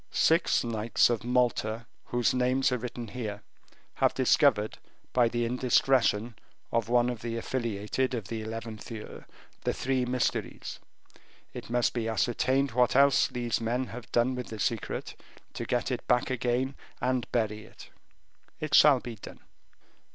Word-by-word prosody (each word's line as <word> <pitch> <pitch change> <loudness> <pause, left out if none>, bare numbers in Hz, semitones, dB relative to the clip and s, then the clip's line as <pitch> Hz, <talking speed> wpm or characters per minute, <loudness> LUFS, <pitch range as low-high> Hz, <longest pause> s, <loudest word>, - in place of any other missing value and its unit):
"Six 165 +1 +3
knights 115 0 +2
of 115 - -1
Malta, 120 -2 0 0.2
whose 120 -1 +1
names 130 +1 +2
are 125 - +1
written 120 -1 -6
here, 105 -3 -5 0.5
have - - +1
discovered, 105 +1 +3 0.3
by 120 -2 +4
the 120 0 -1
indiscretion 120 -2 +2 0.4
of 115 -1 0
one 120 0 +4
of 120 -3 -3
the 115 0 -3
affiliated 115 +1 -2
of 110 -5 -5
the 110 0 -4
eleventh 110 0 -7
year, 110 -2 -9 0.4
the - - 0
three 130 -1 0
mysteries; 125 0 -2 0.7
it - - -8
must 120 0 +1
be 115 -2 -2
ascertained 130 +4 +1
what 125 +1 +2
else 140 0 +5
these 120 -1 -2
men 120 +3 0
have 120 -1 -9
done 120 +2 +2
with 125 -1 -5
the 110 - -7
secret, 115 0 -2 0.4
to - - -5
get - - -1
it - - -4
back 125 - +2
again 125 +2 0 0.3
and 125 -1 -1
bury 110 -2 -1
it." - - -14 0.7
"It 155 -1 -4
shall 140 -4 +7
be 120 -2 -7
done." - - -11
120 Hz, 150 wpm, -29 LUFS, 115-125 Hz, 0.7 s, shall